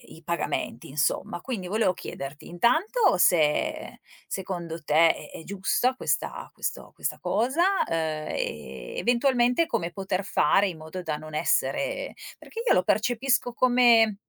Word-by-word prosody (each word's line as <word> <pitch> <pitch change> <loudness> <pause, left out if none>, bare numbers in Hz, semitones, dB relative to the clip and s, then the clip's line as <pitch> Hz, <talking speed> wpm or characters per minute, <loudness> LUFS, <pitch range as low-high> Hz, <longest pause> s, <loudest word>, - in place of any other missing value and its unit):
i 165 - -16
pagamenti, 170 -8 -3
insomma. 150 +4 -1
Quindi 210 -8 -5
volevo 200 -2 +1
chiederti, 140 -2 -8
intanto 315 - +2
se 155 -4 +2 0.3
secondo 170 -3 -5
te 160 +3 +4
è - - -16
è 160 - -8
giusta 200 +7 0
questa - - -2
questo - - -5
questa - - -3
cosa, 260 +9 0 0.3
uhm, - - -3
e 75 - -4
eventualmente 245 +4 +2
come 175 - -2
poter 190 0 -2
fare 200 +2 +3
in 165 - -8
modo 160 +4 -7
da 155 -2 -2
non 155 0 -9
essere - - 0 0.3
perché 460 +1 -7
io - - +5
lo 180 - +4
percepisco 245 +4 +1
come 240 -4 +5
190 Hz, 140 wpm, -26 LUFS, 160-245 Hz, 0.3 s, io